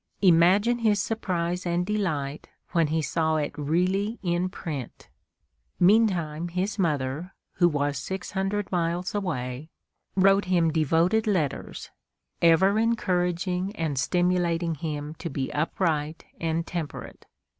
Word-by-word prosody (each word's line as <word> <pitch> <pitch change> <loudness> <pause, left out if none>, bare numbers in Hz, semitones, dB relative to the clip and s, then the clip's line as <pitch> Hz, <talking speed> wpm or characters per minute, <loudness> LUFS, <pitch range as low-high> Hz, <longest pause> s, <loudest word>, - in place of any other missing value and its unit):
Imagine 190 +7 +5
his 215 -3 +2
surprise 180 -5 -2
and 175 0 0
delight 160 -9 -2 0.2
when 165 -2 +2
he 160 +1 0
saw 160 0 0
it 150 -2 -1
really 185 +9 0
in 175 0 0
print! 150 -9 -7 0.7
Meantime 175 -5 +3
his 185 +4 -2
mother, 150 +1 -1 0.2
who 175 -1 +5
was 145 -2 -1
six 190 +3 -5
hundred 195 +1 -2
miles 175 0 -1
away, 150 -8 -3 0.5
wrote 195 +1 +4
him 175 -3 +2
devoted 165 +8 +2
letters, 170 -9 -2 0.5
ever 190 +5 +5
encouraging 185 -3 0
and 155 -8 -2
stimulating 175 +1 +1
him 150 -1 -4
to 170 - -4
be 135 -2 -3
upright 155 0 -1
and 165 0 -1
temperate. 165 -4 -6
175 Hz, 120 wpm, -26 LUFS, 155-190 Hz, 0.7 s, Imagine